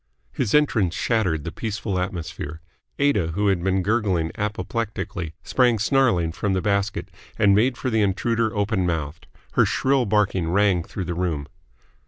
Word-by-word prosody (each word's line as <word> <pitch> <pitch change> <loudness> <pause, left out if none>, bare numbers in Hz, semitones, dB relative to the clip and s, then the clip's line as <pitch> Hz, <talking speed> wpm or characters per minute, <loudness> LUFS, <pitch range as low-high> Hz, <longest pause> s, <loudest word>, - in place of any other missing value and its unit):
His 110 - 0
entrance 110 - +2
shattered 90 -10 0
the 85 - -5
peaceful 105 -3 -3
atmosphere. 85 -4 -5 0.4
Aida, 105 - +1
who 100 +3 +1
had 90 -3 0
been 95 0 +1
gurgling 100 -6 +1
apoplectically, 105 -5 -3
sprang 125 -3 +3
snarling 110 -7 +2
from 95 +4 -1
the 95 - +1
basket, 100 0 -1 0.3
and 100 -1 +5
made 120 +5 +3
for 130 - -2
the 110 -1 +2
intruder 110 +3 +1
open 100 -3 0
mouthed. 80 0 -3 0.2
Her - - +4
shrill 135 -3 +1
barking 95 -4 +1
rang 95 -1 +3
through 95 +2 -5
the 85 - -3
room. 85 -5 -2
100 Hz, 155 wpm, -23 LUFS, 85-110 Hz, 0.4 s, and